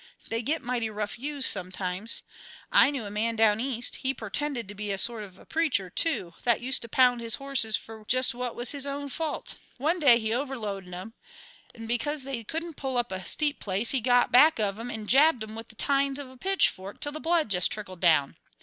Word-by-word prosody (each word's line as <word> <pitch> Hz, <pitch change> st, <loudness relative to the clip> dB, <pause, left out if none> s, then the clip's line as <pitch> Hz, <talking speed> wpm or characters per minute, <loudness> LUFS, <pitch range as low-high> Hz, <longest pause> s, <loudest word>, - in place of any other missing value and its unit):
They 225 Hz, 0 st, -1 dB
get 295 Hz, +5 st, -2 dB
mighty 240 Hz, -2 st, -2 dB
rough 210 Hz, +1 st, -5 dB
used 285 Hz, 0 st, +3 dB
some 185 Hz, -2 st, +2 dB
times. 185 Hz, +4 st, -1 dB, 0.5 s
I -, -, +6 dB
knew 275 Hz, -6 st, -3 dB
a 205 Hz, -, -6 dB
man 225 Hz, +2 st, -1 dB
down 220 Hz, -1 st, +3 dB
East; 245 Hz, -1 st, +1 dB
he 265 Hz, +1 st, -1 dB
purtended 235 Hz, +2 st, -3 dB
to 205 Hz, -, -8 dB
be 205 Hz, 0 st, -4 dB
a 195 Hz, -, -2 dB
sort 230 Hz, +2 st, -1 dB
of 190 Hz, -3 st, -12 dB
a -, -, -17 dB
preacher, 295 Hz, -, 0 dB
too, 215 Hz, -, 0 dB
that 235 Hz, -2 st, +3 dB
used 255 Hz, +1 st, 0 dB
to 235 Hz, -, -6 dB
pound 250 Hz, -1 st, +3 dB
his 230 Hz, 0 st, 0 dB
horses 270 Hz, -6 st, +1 dB
fer 220 Hz, -1 st, -12 dB
just 255 Hz, 0 st, +3 dB
what 245 Hz, 0 st, -4 dB
was 240 Hz, +1 st, -1 dB
his 280 Hz, -1 st, -2 dB
own 280 Hz, 0 st, -4 dB
fault. 310 Hz, +3 st, -3 dB, 0.2 s
One 315 Hz, +7 st, 0 dB
day 265 Hz, -7 st, +7 dB
he 220 Hz, -1 st, -2 dB
overloaded 215 Hz, -8 st, -4 dB
'em, 185 Hz, +5 st, -8 dB, 0.7 s
'nd 225 Hz, -, -7 dB
because 270 Hz, +5 st, -1 dB
they 260 Hz, -4 st, -4 dB
couldn't 325 Hz, +6 st, -4 dB
pull 265 Hz, -2 st, -2 dB
up 240 Hz, -2 st, 0 dB
a 190 Hz, 0 st, -4 dB
steep 295 Hz, -1 st, 0 dB
place 200 Hz, +3 st, -1 dB
he 265 Hz, -, +1 dB
got 245 Hz, +1 st, +3 dB
back 300 Hz, +6 st, +6 dB
of 205 Hz, 0 st, 0 dB
'em 240 Hz, +2 st, -5 dB
'nd 215 Hz, -1 st, -5 dB
jabbed 275 Hz, -1 st, +4 dB
'em 215 Hz, 0 st, -8 dB
with 225 Hz, 0 st, -7 dB
the -, -, -14 dB
tines 275 Hz, +2 st, +1 dB
o' 270 Hz, -3 st, -8 dB
a -, -, -15 dB
pitchfork 245 Hz, -, 0 dB
till 290 Hz, -, -1 dB
the 310 Hz, -, -6 dB
blood 325 Hz, -4 st, +1 dB
jest 180 Hz, -2 st, +2 dB
trickled 185 Hz, -4 st, -6 dB
down. 155 Hz, -6 st, +3 dB
240 Hz, 225 wpm, -27 LUFS, 210-275 Hz, 0.7 s, day